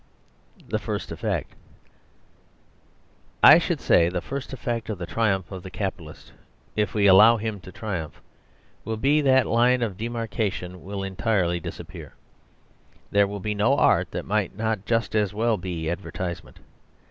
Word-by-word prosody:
The - - -1
First - - -4
Effect - - -3 1.9
I - - +10
should - - -2
say 85 0 +4
the 90 0 -2
first 135 +7 -6
effect 120 -3 -4
of 105 - -3
the 85 - -5
triumph 95 -3 -1
of 95 -2 -6
the 95 - -9
capitalist 95 -6 -6 0.4
(if 105 -2 -1
we 105 -1 +2
allow 105 +4 +7
him 110 -2 -4
to 95 - -12
triumph) 95 -9 -5 0.6
will 110 +1 -3
be 145 +6 +3
that 130 -2 +4
that - - -7
line 120 +2 +3
of 100 -5 -3
demarcation 110 -5 -3
will 100 +1 -5
entirely 95 -3 0
disappear. - - -9 1.0
There 100 0 +4
will 100 0 -6
be 105 +2 -2
no 110 +7 +2
art - - +3
that - - -5
might 100 -2 -1
not 110 -2 -2
just 115 -1 0
as 105 -2 0
well 115 0 +1
be 85 -3 -4
advertisement. 90 0 -5
105 Hz, 155 wpm, -24 LUFS, 95-115 Hz, 1.9 s, I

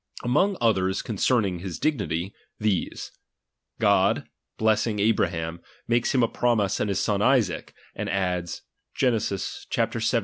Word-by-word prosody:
Among 185 +11 +2
others 95 -5 +1
concerning 105 -4 +1
his 90 -2 -5
dignity, 95 - -1 0.3
these. 105 -5 -1 0.7
God, - - +3 0.3
blessing 110 0 +2
Abraham, 85 -6 0 0.3
makes 120 +2 +1
him 125 - +4
a - - +4
promise 110 -6 +1
of - - 0
his 100 -2 0
son 100 -1 0
Isaac; 120 -8 +1 0.2
and - - -4
adds 90 -3 -2 0.3
(Gen. 125 -4 +2
xvii. 100 -2 -4
105 Hz, 125 wpm, -25 LUFS, 95-115 Hz, 0.7 s, him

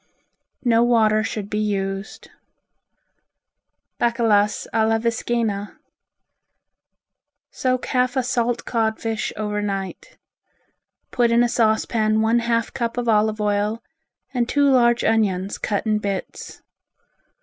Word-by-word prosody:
No 230 -1 +4
water 220 -3 +3
should 210 -2 -4
be 210 0 -2
used. 195 -1 -3 1.7
Bacalas 220 -3 +2
a 220 -1 +2
la 225 0 +2
Viscaina 225 -2 -2 1.7
Soak 255 -2 -1
half 255 0 0
a 260 - +2
salt 240 -1 -1
codfish 220 -1 -1
over 210 -1 -2
night. 195 -2 -5 0.9
Put 240 -1 +2
in 235 +1 +4
a - - +3
saucepan 220 -1 +1
one 225 +2 +3
half 230 -1 -1
cup 235 -1 -3
of 245 -1 -2
olive 215 -1 +2
oil, 210 +2 -1 0.5
and 245 -2 0
two 285 0 +3
large 240 -2 +3
onions 200 -4 0
cut 205 0 -2
in 215 -1 +1
bits. 200 -2 -6
225 Hz, 115 wpm, -22 LUFS, 210-235 Hz, 1.7 s, No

